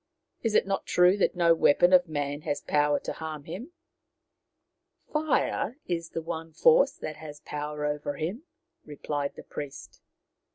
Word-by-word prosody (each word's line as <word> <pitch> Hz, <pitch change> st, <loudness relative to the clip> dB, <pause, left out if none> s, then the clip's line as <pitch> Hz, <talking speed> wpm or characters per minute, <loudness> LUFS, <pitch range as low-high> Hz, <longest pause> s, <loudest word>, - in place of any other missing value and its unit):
" -, -, -51 dB
Is 225 Hz, -2 st, 0 dB
it -, -, +5 dB
not 195 Hz, 0 st, -2 dB
true 180 Hz, +2 st, +5 dB
that 200 Hz, -, +1 dB
no 170 Hz, -1 st, +5 dB
weapon 170 Hz, +3 st, +4 dB
of 180 Hz, -1 st, +6 dB
man 145 Hz, -1 st, -2 dB
has 145 Hz, -, -2 dB
power 145 Hz, -1 st, +2 dB
to -, -, -4 dB
harm 155 Hz, -2 st, -6 dB
him? 205 Hz, -, -8 dB, 0.5 s
" -, -, -55 dB
" -, -, -36 dB
Fire 300 Hz, -5 st, 0 dB
is 170 Hz, -2 st, -3 dB
the 165 Hz, -, -5 dB
one 165 Hz, -1 st, -6 dB
force 485 Hz, -, +5 dB
that 155 Hz, -1 st, -7 dB
has 150 Hz, -2 st, -10 dB
power 150 Hz, 0 st, -4 dB
over 145 Hz, -1 st, -2 dB
him," 170 Hz, -, -3 dB, 0.4 s
replied 145 Hz, -1 st, -4 dB
the -, -, -10 dB
priest. 145 Hz, -2 st, -8 dB
160 Hz, 170 wpm, -28 LUFS, 150-180 Hz, 0.5 s, of